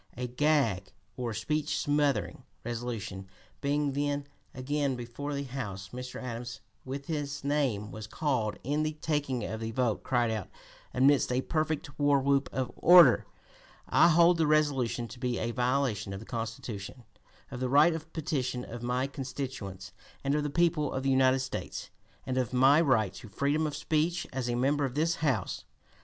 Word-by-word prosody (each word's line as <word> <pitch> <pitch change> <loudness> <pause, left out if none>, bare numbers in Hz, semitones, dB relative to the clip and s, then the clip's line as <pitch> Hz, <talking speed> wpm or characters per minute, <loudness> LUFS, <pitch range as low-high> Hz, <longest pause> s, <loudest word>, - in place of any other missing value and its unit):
A 125 - -2
"gag" 125 - +1 0.2
or 120 -2 -3
"speech 150 +8 -1
smothering" 140 - 0 0.2
resolution 115 -5 -5 0.3
being 145 0 +1
then 145 0 -1 0.3
again 140 +1 -1
before 125 +4 -5
the 140 - -2
House, 105 -8 -6
Mr. 125 +1 -7
Adams, 120 -1 -6 0.2
when 135 +2 -5
his 145 -2 -4
name 135 -8 0
was 110 0 -7
called 120 -5 -1
in 145 +4 0
the 155 0 -1
taking 145 -6 -1
of 110 +1 -4
the 110 0 -3
vote, 115 -1 0
cried 120 -3 +1
out 110 -5 -3 0.4
"amidst 135 +1 +4
a 125 +1 +1
perfect 155 -1 -2
war 145 -1 +4
whoop 140 +1 +2
of 130 -2 -2
'order:' 175 0 +7 0.6
'I - - +6
hold 170 +1 +5
the 160 - +3
resolution 140 -6 +1
to 120 - -11
be 125 -1 -1
a 115 +1 -1
violation 125 -5 0
of 95 - -5
the 110 - -10
Constitution, 115 0 -5 0.5
of 125 - -5
the 130 0 -1
right 150 +5 +6
of 160 0 -7
petition 130 -6 -2
of 120 0 -8
my 125 +2 0
constituents 130 -9 -6 0.3
and 140 0 +1
of 150 - +2
the 150 - -2
people 155 -2 +1
of 130 - -2
the 135 - +2
United 130 0 +4
States, 130 - -5 0.3
and 130 0 -1
of 125 -1 -2
my 135 +5 +6
right 110 - +2
to 115 - -10
freedom 145 +8 0
of 145 - -4
speech 160 +3 0
as 125 -2 -2
a 120 - 0
member 140 +4 +1
of 135 -2 -2
this 165 +3 +1
House.'" 130 - -1
130 Hz, 175 wpm, -30 LUFS, 120-145 Hz, 0.6 s, order